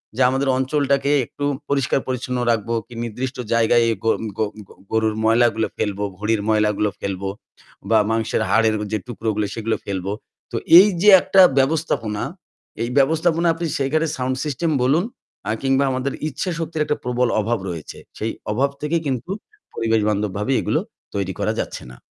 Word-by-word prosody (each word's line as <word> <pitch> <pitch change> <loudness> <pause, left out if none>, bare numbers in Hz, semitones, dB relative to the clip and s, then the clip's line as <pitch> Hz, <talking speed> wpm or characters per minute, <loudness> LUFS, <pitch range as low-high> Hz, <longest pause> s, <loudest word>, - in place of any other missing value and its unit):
যে 130 - -1
আমাদের 135 +1 0
অঞ্চলটাকে 140 +1 +1
একটু 145 - -5 0.2
পরিষ্কার 135 -1 +1
পরিচ্ছন্ন 125 0 -2
রাখবো 115 +1 -1
কি 120 - -13
নির্দিষ্ট 125 +3 -4 0.2
জায়গায় 115 0 +4 0.2
গ - - -2 0.3
গ - - -11 0.3
গ - - -30 0.2
গরুর 110 -1 +1
ময়লাগুলো 115 -1 +3
ফেলবো, 105 -1 -2
ঘড়ির 105 0 0
ময়লাগুলো 105 -1 +2
ফেলবো 95 0 -3 0.6
বা 110 -1 +5
মাংসের 115 -1 0
হাড়ের 110 +1 +3 0.2
যে 110 - +1
টুকরো 115 -2 -3
গুলো 105 -1 0
সেগুলো 115 0 -1
ফেলবো। 95 -1 -3 0.4
তো - - -2 0.2
এই 200 - +7
যে 210 - +7
একটা 190 0 +5 0.2
ব্যবস্থাপনা, 135 -7 0 0.6
এই 120 - -2
ব্যবস্থাপনা 160 +4 +2
আপনি 165 0 -3
সেখানে 155 +4 +1
সাউন্ড 130 0 -1
সিস্টেম 155 +3 -1
বলুন 145 +7 +3 0.5
আ - - +2
কিংবা 135 +1 +3
আমাদের 130 +1 -2 0.2
ইচ্ছা 180 +5 -3
শক্তির 160 -1 -1
একটা 150 -1 -1
প্রবল 125 0 +1
অভাব 115 +1 -1
রয়েছে। 80 -3 -7 0.2
সেই 110 +1 -2 0.2
অভাব 135 +6 +1
থেকে 150 +3 0
কিন্তু 130 +7 -3 0.4
পরিবেশ 115 -1 +1
বান্ধবভাবে 105 +3 -1
এগুলো - - 0 0.4
তৈরি 95 -1 -2
করা - - 0
যাচ্ছে - - -4
না। 60 - -13
120 Hz, 160 wpm, -21 LUFS, 110-140 Hz, 0.6 s, এই